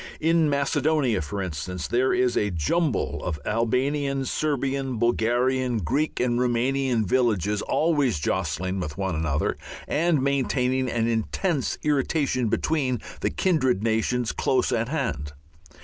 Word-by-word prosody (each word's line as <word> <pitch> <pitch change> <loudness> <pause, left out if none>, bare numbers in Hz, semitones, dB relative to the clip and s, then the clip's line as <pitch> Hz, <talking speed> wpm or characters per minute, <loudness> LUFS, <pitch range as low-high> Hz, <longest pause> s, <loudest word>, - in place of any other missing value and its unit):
In 165 -1 +3
Macedonia, 145 - +1
for 100 +6 -4
instance, 90 +1 -4
there 125 +2 +2
is 125 -1 +2
a 105 - +1
jumble 105 - 0
of 80 -4 -3
Albanian, 135 +5 0
Serbian, 135 -2 -1
Bulgarian, 120 +2 +1
Greek 140 - -1
and 120 -1 +1
Rumanian 125 -1 +1
villages 105 -3 +1
always 145 - +1
jostling 90 +4 -1
one 95 +4 -3
another 80 -2 -1 0.3
and 160 0 +2
maintaining 130 -1 +1
an 115 -1 0
intense 130 - -1
irritation 140 -3 +1
between 130 0 0 0.2
the - - 0
kindred 130 - +1
nations 115 +2 0
close 130 - +1
at 115 0 0
hand. 75 - -2
125 Hz, 120 wpm, -25 LUFS, 105-140 Hz, 0.3 s, In